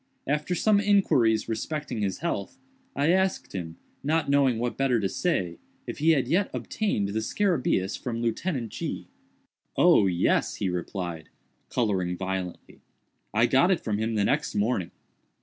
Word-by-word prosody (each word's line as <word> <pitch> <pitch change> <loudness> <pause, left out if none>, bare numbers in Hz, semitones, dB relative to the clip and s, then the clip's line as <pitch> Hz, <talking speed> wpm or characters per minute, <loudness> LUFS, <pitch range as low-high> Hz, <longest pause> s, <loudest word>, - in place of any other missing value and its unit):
After 150 +5 0
some 210 +3 +3
inquiries 190 - +3
respecting 115 +2 -3
his 95 -2 -2
health, 100 - -3 0.4
I 145 +4 +3
asked 190 +1 0
him, 85 -4 -5 0.3
not 155 0 +1
knowing 135 -4 +3
what 120 +1 -2
better 135 -3 +2
to 100 - 0
say, 95 - -1 0.3
if - - -6
he 155 +3 +3
had 135 -4 +1
yet 190 +4 +2
obtained 150 - -1
the 105 +2 -1
scarabæus 125 - 0
from 115 -2 -3
Lieutenant 120 - -2
G——. - - -5 0.7
"Oh, 100 - +6
yes," 90 -1 +1
he 95 - -1
replied, 90 -2 -4 0.4
coloring 95 -6 0
violently, 95 -1 -5 0.5
"I 110 +3 +3
got 135 +8 +4
it 185 - +2
from 105 -2 -2
him 110 +1 -1
the 105 -1 +2
next - - 0
morning. 105 -4 0
115 Hz, 150 wpm, -27 LUFS, 95-155 Hz, 0.7 s, Oh